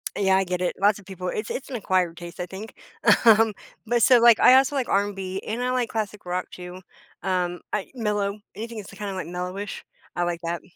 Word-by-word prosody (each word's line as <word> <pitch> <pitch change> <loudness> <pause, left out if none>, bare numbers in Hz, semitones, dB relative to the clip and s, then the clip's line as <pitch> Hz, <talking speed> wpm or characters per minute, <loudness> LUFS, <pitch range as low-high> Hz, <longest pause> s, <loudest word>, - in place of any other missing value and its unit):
Yeah, 190 -1 +3
I 195 - +2
get 180 0 -3
it. 180 - 0
Lots 205 +1 +3
of 195 - -16
people 185 -2 -6
it's 215 0 -4
it's 275 - -5
an 255 - -5
acquired 185 -5 0
taste, 175 +1 -9
I 180 - -2
think. 195 +5 -9 0.5
Um, 225 -1 +6 0.3
but 240 +1 +1
so, 250 -2 +7
like, 235 -2 +7
I 255 - +8
also 270 +2 +4
like 260 -3 0
R&B, 195 -1 -1
and 230 +3 -3
I 250 0 0
like 250 -2 0
classic 210 -3 -4
rock 180 +1 -2
too. 180 +1 -9 0.4
Um, 180 -2 -1
I 210 -2 -2
mellow. 210 -2 -1 0.2
Anything 230 +1 -6
that's 205 - -8
kinda, 200 -1 -5
like, 185 - -5
mellowish, 180 +3 -5 0.3
I 175 - 0
like 175 -1 -2
that. 170 0 -2
200 Hz, 215 wpm, -25 LUFS, 180-220 Hz, 0.5 s, I